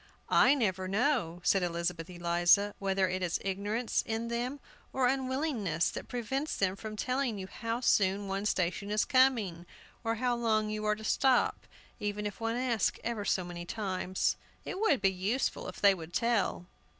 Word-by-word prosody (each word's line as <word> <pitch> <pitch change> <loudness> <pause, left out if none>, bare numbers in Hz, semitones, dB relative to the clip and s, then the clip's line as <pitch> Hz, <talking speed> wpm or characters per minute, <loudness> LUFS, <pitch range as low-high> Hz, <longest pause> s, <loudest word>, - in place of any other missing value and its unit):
"I 270 +3 +6
never 190 -7 0
know," 200 - 0
said 195 - +3
Elizabeth 170 -1 -2
Eliza, 175 +3 +3
"whether 195 -1 +1
it 185 +1 -2
is 175 -2 0
ignorance 205 +5 -1
in 225 +1 -3
them, 245 +4 -2 0.3
or 265 -1 +1
unwillingness, 260 - 0
that - - -7
prevents 265 +5 -2
them 190 -1 +1
from 215 +2 -7
telling 250 +1 -1
you 190 - -5
how 230 +5 -4
soon 200 -4 +2
one 195 +2 -1
station 185 +1 -1
is 210 0 +2
coming, 225 -10 +2 0.4
or 225 0 0
how 245 +1 0
long 215 -2 +1
you 215 0 -3
are 210 0 +2
to 220 - -11
stop, 255 +3 +2 0.3
even 210 0 -3
if 205 +2 -5
one 225 +1 0
asks 245 -4 +1
ever 230 -3 -2
so 185 - +1
many 175 0 -6
times. 185 -1 -1 0.3
It 375 - -4
would 315 - +3
be 195 -1 +3
useful 200 +8 -1
if - - -8
they 200 -1 +6
would 170 -2 -9
tell." 230 -6 +1
210 Hz, 175 wpm, -31 LUFS, 185-240 Hz, 0.4 s, I